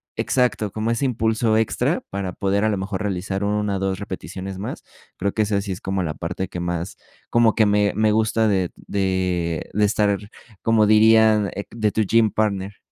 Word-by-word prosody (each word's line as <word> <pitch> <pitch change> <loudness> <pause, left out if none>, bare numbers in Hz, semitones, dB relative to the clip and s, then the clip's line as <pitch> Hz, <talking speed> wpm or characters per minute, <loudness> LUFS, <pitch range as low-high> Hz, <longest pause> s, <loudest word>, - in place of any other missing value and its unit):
exacto, 125 -5 0
como 110 +3 -2
ese 115 +4 0
impulso 115 -2 +1
extra 110 0 +1
para 95 -2 -4
poder 100 +2 0
a 110 - +3
lo 105 - 0
mejor 95 +1 -3
realizar 95 0 -2
1 105 0 0
o - - -2
2 95 -1 -1
repeticiones 95 0 -6
más. 100 - -6 0.3
Creo 100 +1 -1
que 110 - +2
esa 100 -1 0
sí 100 0 -5
es 95 +3 -5
como 95 0 -2
la 80 -4 -3
parte 90 +3 -4
que 90 - -6
más, 85 +1 -3 0.3
como 120 -2 +4
que 110 -2 +3
me 105 0 +2
me 110 0 +3
gusta 110 +1 +2
de 95 -4 +1
de 90 -4 -2
de 105 +1 +2
estar, 100 -1 +2 0.5
como 110 -2 +3
dirían, 110 -1 +5
eh, 100 - -4
de 110 -2 -1
tu 110 - 0
gym 110 +1 +3
partner. 100 -2 -1
100 Hz, 195 wpm, -22 LUFS, 95-110 Hz, 0.5 s, dirían